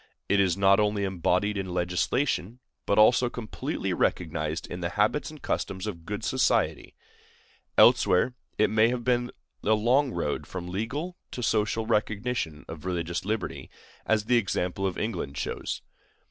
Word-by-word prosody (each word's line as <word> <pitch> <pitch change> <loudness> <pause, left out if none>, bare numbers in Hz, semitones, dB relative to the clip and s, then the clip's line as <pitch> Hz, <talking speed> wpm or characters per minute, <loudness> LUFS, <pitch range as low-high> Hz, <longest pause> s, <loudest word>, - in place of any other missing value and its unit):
It 100 - +3
is 95 -2 +2
not 100 +1 +5
only 105 -1 +1
embodied 95 +2 0
in 95 -1 -4
legislation, 90 - 0 0.3
but 100 - +2
also 120 +3 +5
completely 120 -3 -4
recognized 80 -2 -1
in 90 - -6
the 85 -1 -2
habits 105 +10 +1
and 155 -1 -11
customs 95 -7 -3
of 85 -6 -6
good 105 +1 -4
society. 130 +2 +1 0.8
Elsewhere 90 +8 +5 0.2
it 105 - +3
may 110 +2 +4
be 120 0 0 0.3
a 110 - +3
long 125 +5 +2
road 85 -7 -2
from 90 -2 -6
legal 140 - -3
to 125 - -5
social 110 0 +1
recognition 110 -6 -1
of 80 -2 -8
religious 85 -1 -2
liberty, 110 +1 -3 0.3
as 110 -1 +1
the 120 +2 +4
example 95 -3 -1
of 90 - -4
England 85 -11 -3
shows. - - -3
105 Hz, 145 wpm, -27 LUFS, 90-115 Hz, 0.8 s, not